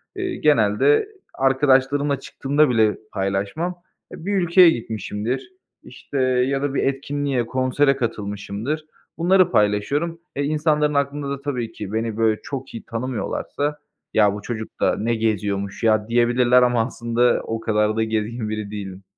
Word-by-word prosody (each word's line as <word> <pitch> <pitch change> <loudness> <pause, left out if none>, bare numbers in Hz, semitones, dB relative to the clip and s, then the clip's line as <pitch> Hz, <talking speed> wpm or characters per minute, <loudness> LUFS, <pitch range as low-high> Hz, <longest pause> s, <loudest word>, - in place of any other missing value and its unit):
Eee, 370 -2 -3
genelde 140 - +3 0.2
arkadaşlarımla 135 +1 +2
çıktığımda 145 +2 +1
bile 110 -3 +2
paylaşmam. 100 - -2 0.4
E, 160 - -10
bir 205 - -1
ülkeye 180 -1 +6
gitmişimdir, 115 - -3 0.3
işte, 140 - -8
ya 130 +2 +1
da 145 -1 -1
bir - - 0
etkinliğe, 135 -2 -1
konsere 130 +3 +2
katılmışımdır, 110 +4 -4 0.3
bunları 180 +1 +4
paylaşıyorum. 140 +12 +1 0.2
E, 140 - -1
insanların 150 0 +1
aklında 140 0 -1
da 140 0 -4
tabii 125 -5 -3
ki 105 0 -7
beni, 110 -1 -2
böyle, 110 -1 +2
çok 135 -1 -6
iyi 115 - -7
tanımıyorlarsa, 130 +4 -3 0.3
ya 105 -2 +4
bu 105 - -6
çocuk 110 0 -6
da - - +2
ne 115 +2 0
geziyormuş 100 -1 -2
ya 110 -1 +3
diyebilirler 120 +1 +4
ama 120 -2 +2
aslında 120 0 +1
o 115 0 -3
kadar 105 -1 +1
da 110 - +1
gezgin 110 0 -2
biri 105 -1 -4
değilim. 95 -2 -7
125 Hz, 145 wpm, -22 LUFS, 110-145 Hz, 0.4 s, ülkeye